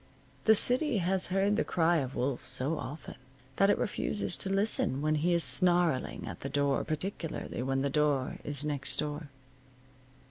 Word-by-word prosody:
The 220 - +6
city 250 +4 +3
has 190 0 +1
heard 195 +2 +1
the - - +2
cry 170 0 +2
of 135 -3 -3
wolf 130 0 -2
so 150 +5 -1
often 140 +3 -8 0.4
that 195 - +4
it - - +3
refuses 205 -3 -2
to 195 - -4
listen 195 -8 +2
when 155 0 +2
he 155 +4 +1
is 170 -1 +3
snarling 175 -7 +1
at - - -7
the 140 - -5
door, 140 0 +1
particularly 160 -4 -4
when 135 +1 -1
the 140 - 0
door 145 -3 0
is 145 0 -4
next 140 -3 -1
door. 150 0 -4
155 Hz, 170 wpm, -30 LUFS, 140-190 Hz, 0.4 s, The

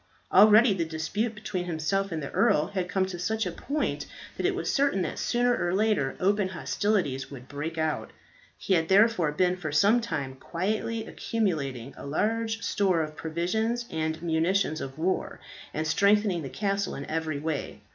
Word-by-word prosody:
Already 215 +3 +7
the 180 -3 -1
dispute 165 +8 -2
between 185 -3 -4
himself 180 +4 -1
and 160 -2 -3
the 140 - -5
earl 150 - +3
had 185 -3 -3
come 190 0 +1
to 185 -2 -6
such 220 +5 -1
a - - -2
point 295 +2 -2 0.3
that - - 0
it - - 0
was - - -2
certain 275 - +2
that 160 - -4
sooner 245 0 +2
or 175 -3 0
later 200 -11 +1
open 200 +1 +2
hostilities 185 -8 -1
would 130 -2 -10
break 155 +3 -5
out. 155 -1 -1 0.5
He 195 - 0
had 165 -2 +2
therefore 195 -5 +4
been 180 +4 +1
for 155 -5 -4
some 205 +10 +4
time 140 - -4
quietly 215 +8 -2
accumulating 140 - -2
a - - -9
large 225 +8 -1
store 185 -5 +2
of 155 0 -7
provisions 220 +10 -1
and 160 0 -2
munitions 165 0 +1
of 135 +1 -6
war, 180 +4 -1 0.3
and 155 - -2
strengthening 200 +2 +3
the 135 - -6
castle 200 +2 -1
in 140 - -6
every 160 -2 -2
way. 150 0 -4
180 Hz, 175 wpm, -27 LUFS, 155-210 Hz, 0.5 s, Already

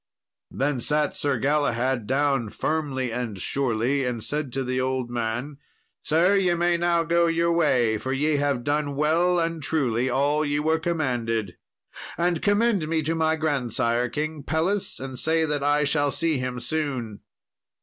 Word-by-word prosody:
Then 135 -2 -1
sat 150 +4 +1
Sir 140 -3 0
Galahad 130 -3 0
down 135 -4 +1
firmly 135 -4 -2
and 120 -5 -3
surely, 130 +3 0
and 120 -3 -3
said 145 -3 -3
to 135 - -1
the 130 0 -1
old 130 -2 -2
man, 120 +5 -3 0.4
"Sir, 170 +6 +3
ye 185 -3 +2
may 175 0 +2
now 170 0 +2
go 170 +1 +2
your 170 +1 +1
way, 125 -10 +2
for 130 - -4
ye 145 +3 +1
have 140 -4 0
done 145 0 -1
well 165 +5 +2
and 165 -1 -1
truly 130 -5 0
all 145 +4 +1
ye 145 -1 0
were 160 +2 +1
commanded, 120 - -1 0.6
and 175 -1 +1
commend 205 -4 +2
me 160 0 0
to 160 +3 0
my 160 -1 +1
grandsire, 125 -5 0
King 150 +4 -3
Pelles, 165 +8 -1
and 130 -2 -6
say 160 0 +2
that 150 -2 -2
I 145 +1 +3
shall 145 0 +1
see 160 -1 0
him 125 -1 -3
soon." 125 -6 -3
145 Hz, 160 wpm, -25 LUFS, 125-160 Hz, 0.6 s, Sir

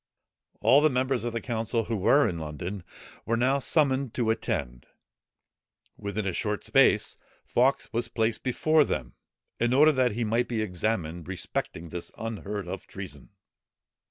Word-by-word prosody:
All 140 - +6
the 155 - +5
members 130 -1 0
of 120 - -2
the 115 - -2
council, 115 -1 -1
who 115 - -2
were 135 +8 +4
in 85 -5 -3
London, 85 +5 -5 0.4
were 115 +1 0
now 130 +4 +2
summoned 135 -3 +1
to 115 -3 +2
attend. 60 - -3 1.1
Within 100 +1 -4
a 95 - -1
short 105 +2 -2
space, - - +3 0.3
Fawkes 130 +3 +1
was 115 +1 0
placed 115 -1 -1
before 155 +4 +3
them, 65 - -3 0.5
in 120 +1 +2
order 150 +3 +7
that 130 -5 +2
he 120 +2 -1
might 115 +2 +1
be 115 -3 -1
examined 90 -4 -2
respecting 90 -2 -4
this 85 +1 -6
unheard 105 -3 -4
of 95 +1 -6
treason. 90 -8 -9
115 Hz, 155 wpm, -27 LUFS, 95-125 Hz, 1.1 s, order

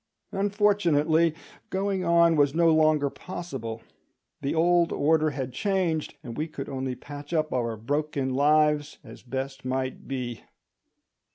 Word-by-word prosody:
Unfortunately, 175 -6 +2 0.3
going 190 -1 -1
on 170 -1 +4
was 145 -1 +3
no 165 -1 +5
longer 155 -2 +3
possible; 135 -12 -6 0.6
the 140 - -1
old 170 +1 +3
order 155 +1 +2
had 135 -3 -5
changed, 180 -2 -1
and 120 -4 -7
we 155 +5 -2
could 140 -3 -7
only 130 -1 -3
patch 145 +4 -9
up 155 -2 0
our 115 -3 -1
broken 140 +2 -2
lives 150 +1 +3
as - - -12
best 135 +2 -5
might 130 0 -3
be. 125 -4 -4
150 Hz, 130 wpm, -26 LUFS, 135-170 Hz, 0.6 s, no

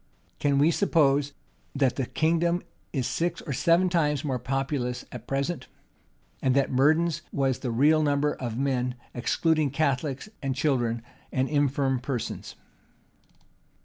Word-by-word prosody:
Can 140 -1 +2
we 150 +4 +5
suppose 145 -6 +2 0.4
that 135 -3 +2
the 130 -3 -2
kingdom 170 +2 +1 0.3
is 130 -5 -1
six 170 +7 -1
or 145 - -4
seven 170 +7 +3
times 150 -5 +1
more 130 -4 -1
populous 130 -1 -2
at 120 -1 -9
present? 140 +5 -2 0.7
and 130 -1 +2
that 140 -1 +2
Murden's 160 +5 +3
was 135 -2 0
the 125 - -3
real 145 +7 +4
number 145 0 +2
of 120 -3 -5
men, 125 -2 0 0.2
excluding 155 +4 +1
Catholics, 140 +1 -1
and 135 -2 -2
children, 120 -6 0 0.3
and 130 0 +1
infirm 140 -2 +1
persons? 125 -1 -4
140 Hz, 135 wpm, -27 LUFS, 130-155 Hz, 0.7 s, we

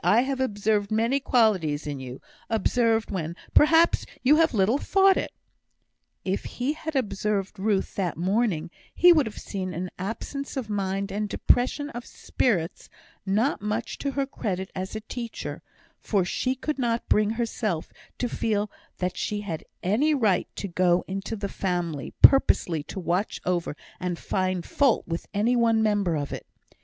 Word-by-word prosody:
I 230 - +5
have 265 0 -2
observed 205 -4 0
many 230 +5 +2
qualities 200 - +2
in 145 -2 -4
you 130 0 -8 0.3
observed 225 0 +1
when, 170 -3 -3 0.2
perhaps, 325 +3 +5 0.2
you 290 +4 +6
have 325 0 +4
little 220 +5 +2
thought 390 +2 +4
it." - - -2 0.9
If 190 +1 -1
he 255 +4 -2
had 315 0 -6
observed 205 -4 -1
Ruth 200 -1 0
that 180 -6 -1
morning, 180 -2 0 0.2
he 350 +1 +8
would 305 -6 +3
have 210 - -8
seen 185 -3 -5
an 180 +2 -4
absence 275 +9 -5
of 230 -5 -3
mind, 195 -1 -1
and 210 +1 -2
depression 285 +7 +1
of 240 0 -7
spirits, 180 -10 -1 0.4
not 220 +9 +1
much 210 +2 -3
to 280 - -1
her 275 -1 0
credit 190 -8 -4
as 190 +3 -5
a 220 - -4
teacher; 230 +1 -6 0.4
for 195 -4 +1
she 255 +8 -1
could 295 +2 -3
not 235 -2 0
bring 210 0 +3
herself 215 -7 -2 0.2
to 245 - -1
feel 210 -3 -1 0.3
that 180 0 -2
she 210 -1 -2
had 170 -6 -5 0.2
any 270 - +2
right 215 -9 +2
to 200 - -4
go 180 -1 +2
into 195 +4 -4
the 200 -1 -3
family 175 -7 -2
purposely 175 - +6
to 190 - -6
watch 180 +3 -1
over 175 -4 -1 0.2
and 180 -1 -2
find 185 -1 -1
fault 275 -4 +2
with 165 0 -4
any 215 +4 +2
one 230 -2 +3
member 205 -6 +1
of 145 -2 -3
it. - - -7
210 Hz, 165 wpm, -26 LUFS, 185-245 Hz, 0.9 s, he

